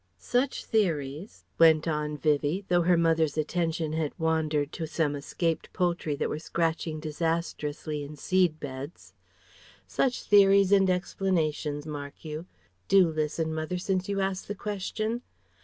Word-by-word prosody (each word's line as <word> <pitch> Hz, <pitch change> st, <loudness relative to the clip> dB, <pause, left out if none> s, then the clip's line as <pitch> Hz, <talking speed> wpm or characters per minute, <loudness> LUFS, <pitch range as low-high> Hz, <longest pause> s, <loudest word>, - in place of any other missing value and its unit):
Such 255 Hz, +2 st, -1 dB
theories" 165 Hz, -4 st, -1 dB
went 160 Hz, -1 st, +6 dB
on 150 Hz, -1 st, -1 dB
Vivie, 150 Hz, +6 st, +1 dB
though 175 Hz, -1 st, +4 dB
her 175 Hz, 0 st, +4 dB
mother's 165 Hz, -2 st, +2 dB
attention 160 Hz, 0 st, -1 dB
had 160 Hz, -2 st, -2 dB
wandered 155 Hz, -3 st, 0 dB
to 160 Hz, -, -4 dB
some 155 Hz, -2 st, 0 dB
escaped 165 Hz, +3 st, -2 dB
poultry 170 Hz, -4 st, 0 dB
that -, -, -1 dB
were 150 Hz, -, -3 dB
scratching 160 Hz, -1 st, -1 dB
disastrously 155 Hz, -1 st, -2 dB
in 145 Hz, +2 st, -8 dB
seed 180 Hz, -1 st, +1 dB
beds 140 Hz, +2 st, -8 dB, 0.7 s
"Such 250 Hz, -2 st, 0 dB
theories 200 Hz, -1 st, +5 dB
and 195 Hz, -2 st, +5 dB
explanations, 165 Hz, -5 st, -1 dB
mark 145 Hz, 0 st, -7 dB
you 155 Hz, +3 st, -6 dB, 0.4 s
do 185 Hz, -4 st, +5 dB
listen, 155 Hz, +1 st, -1 dB
mother, 160 Hz, +3 st, -2 dB
since 185 Hz, +1 st, -1 dB
you 200 Hz, -1 st, 0 dB
asked 190 Hz, -1 st, -2 dB
the 205 Hz, -, -4 dB
question..." 215 Hz, +3 st, -3 dB
160 Hz, 140 wpm, -28 LUFS, 150-185 Hz, 0.7 s, went